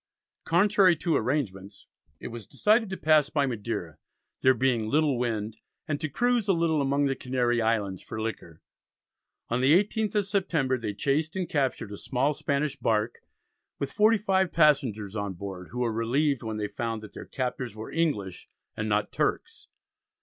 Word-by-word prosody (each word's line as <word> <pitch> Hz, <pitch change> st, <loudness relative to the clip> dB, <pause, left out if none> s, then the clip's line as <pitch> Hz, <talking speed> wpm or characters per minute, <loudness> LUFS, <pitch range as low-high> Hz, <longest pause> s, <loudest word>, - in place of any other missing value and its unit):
Contrary 190 Hz, +1 st, +4 dB
to 165 Hz, 0 st, 0 dB
arrangements 105 Hz, -7 st, -2 dB, 0.3 s
it -, -, -6 dB
was 115 Hz, -4 st, -9 dB
decided 220 Hz, 0 st, +2 dB
to 190 Hz, -, -4 dB
pass 155 Hz, -2 st, +4 dB
by 145 Hz, -2 st, +1 dB
Madeira, 105 Hz, -, -4 dB, 0.4 s
there 130 Hz, 0 st, +5 dB
being 120 Hz, -3 st, +1 dB
"little 150 Hz, 0 st, +2 dB
wind," 110 Hz, -3 st, -2 dB, 0.3 s
and 145 Hz, -3 st, -2 dB
to 155 Hz, -, -2 dB
"cruise 240 Hz, -, +1 dB
a 195 Hz, -, +4 dB
little 165 Hz, -3 st, +1 dB
among 140 Hz, +1 st, +1 dB
the 135 Hz, -1 st, 0 dB
Canary 125 Hz, -2 st, 0 dB
Islands 105 Hz, -5 st, 0 dB
for 110 Hz, -, -7 dB
liquor." 110 Hz, -7 st, -6 dB, 0.9 s
On 120 Hz, +2 st, 0 dB
the 135 Hz, +3 st, +5 dB
18th 210 Hz, +1 st, -2 dB
of 205 Hz, -2 st, +2 dB
September 180 Hz, -10 st, 0 dB
they 105 Hz, -3 st, -4 dB
chased 155 Hz, -, 0 dB
and 185 Hz, -2 st, -2 dB
captured 135 Hz, -, -1 dB
a 100 Hz, -, -6 dB
small 135 Hz, +3 st, 0 dB
Spanish 140 Hz, 0 st, -1 dB
bark 110 Hz, +1 st, 0 dB, 0.6 s
with 140 Hz, -, -3 dB
forty 220 Hz, +2 st, +4 dB
five 190 Hz, -3 st, +1 dB
passengers 125 Hz, -, +2 dB
on 100 Hz, -2 st, -2 dB
board, 95 Hz, -1 st, -7 dB
who 125 Hz, +2 st, -4 dB
were 115 Hz, -2 st, 0 dB
relieved 130 Hz, +5 st, +1 dB
when 110 Hz, -2 st, -4 dB
they 105 Hz, -1 st, -2 dB
found 115 Hz, +1 st, -4 dB
that 110 Hz, -, -11 dB
their -, -, -8 dB
captors 125 Hz, -3 st, -3 dB
were 110 Hz, 0 st, -7 dB
English 120 Hz, -, -2 dB, 0.3 s
and 110 Hz, 0 st, -3 dB
not 105 Hz, 0 st, 0 dB
Turks. -, -, -2 dB
130 Hz, 170 wpm, -27 LUFS, 110-155 Hz, 0.9 s, there